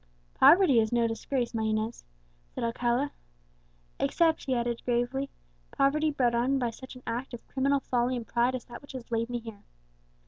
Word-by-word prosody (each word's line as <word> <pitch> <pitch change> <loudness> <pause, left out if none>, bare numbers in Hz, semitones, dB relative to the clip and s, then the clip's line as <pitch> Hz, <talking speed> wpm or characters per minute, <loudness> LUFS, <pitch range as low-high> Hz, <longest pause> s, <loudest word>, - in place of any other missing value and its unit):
"Poverty 330 - +6
is 220 -1 +1
no 235 -1 +3
disgrace, 240 +2 -2
my 225 - -1
Inez," 220 +1 -1 0.5
said - - -6
Alcala; 240 +4 0 0.9
"except," 320 - +2
he 265 -2 0
added 235 -1 -2
gravely, 245 +3 0 0.4
"poverty 305 +3 +2
brought 250 -5 +1
on 250 +4 +2
by 245 -3 0
such 260 +3 -11
an 255 - -13
act 240 +2 -4
of 235 - -14
criminal 275 +1 +1
folly 250 0 0
and 235 - -5
pride 240 +3 +1
as 255 - -6
that 240 -1 -10
which 285 - -12
has 250 -2 -8
laid 230 0 0
me 245 - -2
here." 225 -3 -9
245 Hz, 180 wpm, -29 LUFS, 235-270 Hz, 0.9 s, Poverty